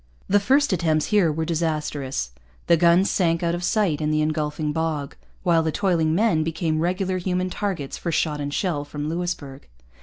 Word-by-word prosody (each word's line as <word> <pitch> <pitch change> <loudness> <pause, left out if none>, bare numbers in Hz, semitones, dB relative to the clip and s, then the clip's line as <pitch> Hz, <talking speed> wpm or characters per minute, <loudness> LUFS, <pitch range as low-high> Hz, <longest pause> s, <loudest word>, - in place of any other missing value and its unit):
The 205 - +4
first 270 +4 +3
attempts 160 -3 +1
here 190 -6 +4
were 160 +2 -2
disastrous. 150 - -2 0.3
The 170 - +5
guns 170 +3 +4
sank 170 -2 +1
out 170 0 +1
of 175 +1 -3
sight 180 -6 +1
in 150 - 0
the 155 0 +2
engulfing 155 0 -1
bog; 155 -3 -2 0.3
while 170 -3 +3
the 160 0 -1
toiling 165 -4 +1
men 195 -6 +2
became 160 0 -1
regular 185 +2 0
human 180 0 -1
targets 185 -10 -3
for 170 - -2
shot 150 -2 0
and 145 0 -3
shell 155 -2 -1
from 145 +1 -5
Louisbourg. 160 -5 -4
165 Hz, 180 wpm, -23 LUFS, 155-180 Hz, 0.3 s, The